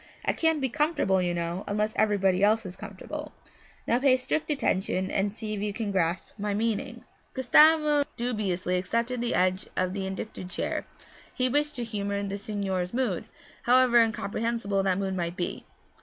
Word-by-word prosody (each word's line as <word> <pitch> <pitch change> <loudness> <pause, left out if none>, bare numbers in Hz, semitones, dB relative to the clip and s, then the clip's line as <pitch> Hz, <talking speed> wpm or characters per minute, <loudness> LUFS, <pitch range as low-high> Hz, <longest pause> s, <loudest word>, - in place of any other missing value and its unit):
I - - +2
can't 320 -2 +2
be 265 - +1
comfortable, 290 - +1
you 175 -1 0
know, 170 +2 -3
unless 210 +1 0
everybody 195 -3 +2
else 220 +1 +3
is 185 -1 -6
comfortable. - - -7 0.5
Now 235 - +2
pay 260 -1 +4
strict 295 +5 -2
attention 190 -9 0
and 200 +1 +1
see 215 0 -5
if 205 - -3
you 210 -1 -2
can 215 -1 -3
grasp 175 -2 0
my 205 0 -1
meaning.' 220 0 -2 0.3
Gustavo 300 +3 +5
dubiously 195 -7 -1
accepted 235 +6 -1
the 240 - 0
edge 185 +1 +1
of 185 0 0
the 195 -1 -3
indicated 190 -1 -6
chair; - - -3 0.4
he 255 0 0
wished 295 +3 +1
to 245 - -3
humour 200 -3 -2
the 200 0 -4
signore's 195 -2 -3
mood, 260 0 0 0.4
however 250 -1 +6
incomprehensible 220 -1 -1
that 190 -1 +1
mood 195 -1 -2
might 170 -1 -2
be. 175 - -3
210 Hz, 170 wpm, -27 LUFS, 190-245 Hz, 0.5 s, however